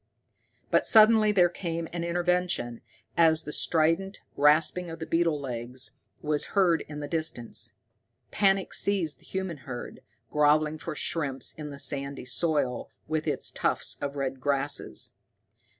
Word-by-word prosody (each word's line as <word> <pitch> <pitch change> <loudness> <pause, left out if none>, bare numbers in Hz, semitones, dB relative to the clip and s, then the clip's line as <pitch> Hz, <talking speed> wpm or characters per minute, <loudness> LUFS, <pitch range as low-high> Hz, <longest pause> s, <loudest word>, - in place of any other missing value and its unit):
But - - +4
suddenly 215 -1 +6
there 180 -4 +5
came 170 -2 -4
an 170 -1 -3
intervention 175 -7 0 0.3
as 160 -2 +4
the 150 - -6
strident 165 +6 +1 0.2
rasping 155 +4 +4
of 165 0 -7
beetle 165 -2 +2
legs 125 -1 -4 0.3
was 150 -1 0
heard 175 -4 +4
in 150 -1 -7
the 145 - -4
distance. 160 -8 -2 0.6
Panic 195 -1 +2
seized 190 -7 +1
the - - -21
human 190 -4 -4
herd, 130 -2 -8 0.3
grovelling 150 +1 +3
for 160 -1 -5
shrimps 145 -4 0
in 150 -1 -7
the 140 - -8
sandy 140 -1 -2
soil 130 -1 0 0.2
with 155 0 -2
its - - 0
tufts - - -1
of 140 0 -3
red 135 -1 -3
grasses. 140 +1 -1
155 Hz, 135 wpm, -27 LUFS, 140-175 Hz, 0.6 s, suddenly